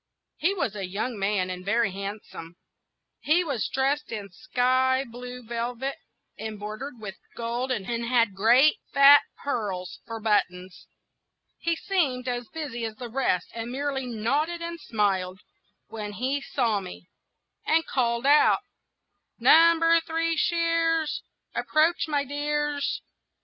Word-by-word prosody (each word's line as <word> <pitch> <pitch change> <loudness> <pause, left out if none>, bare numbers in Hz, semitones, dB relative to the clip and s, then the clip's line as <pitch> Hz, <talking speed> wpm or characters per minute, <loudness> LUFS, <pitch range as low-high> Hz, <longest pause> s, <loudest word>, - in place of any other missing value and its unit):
He 370 +6 +1
was 225 - -2
a 195 -3 -4
young 210 +4 -3
man, 195 -2 0
and 180 0 -6
very 210 +1 +1
handsome. 195 -3 -7 0.6
He 335 +4 +2
was 280 -9 -2
dressed 275 +3 -1
in 205 -3 -5
sky 255 +4 +1
blue 250 +1 -9
velvet, 240 +3 -3 0.4
embroidered 220 +4 -6
with 200 -3 -7 0.2
gold, 240 +3 -2
and 210 -6 -2
had 235 -1 +1
great 240 +9 +5
fat 280 +1 +8 0.2
pearls 200 -10 -3
for 230 -1 -5
buttons. 185 -4 -1 0.7
He 335 0 0
seemed 290 -10 -1
as 245 -1 -2
busy 280 -7 -5
as 220 -1 -4
the 245 +1 -7
rest, 220 -8 0
and 230 +1 -5
merely 270 -1 -2
nodded 280 +9 -1
and 335 0 -5
smiled 190 - -1 0.5
when 210 -2 -6
he 260 +6 -1
saw 230 -7 0
me, 180 -2 -9 0.6
and 325 +1 +3
called 235 -1 0
out,— 290 +2 +5 0.7
"Number 330 0 +6
Three 330 0 -1
Shears, 330 -1 +1 0.3
Approach, 320 +2 +2
my 290 -2 0
dears!" 290 0 -2
250 Hz, 130 wpm, -26 LUFS, 215-295 Hz, 0.7 s, fat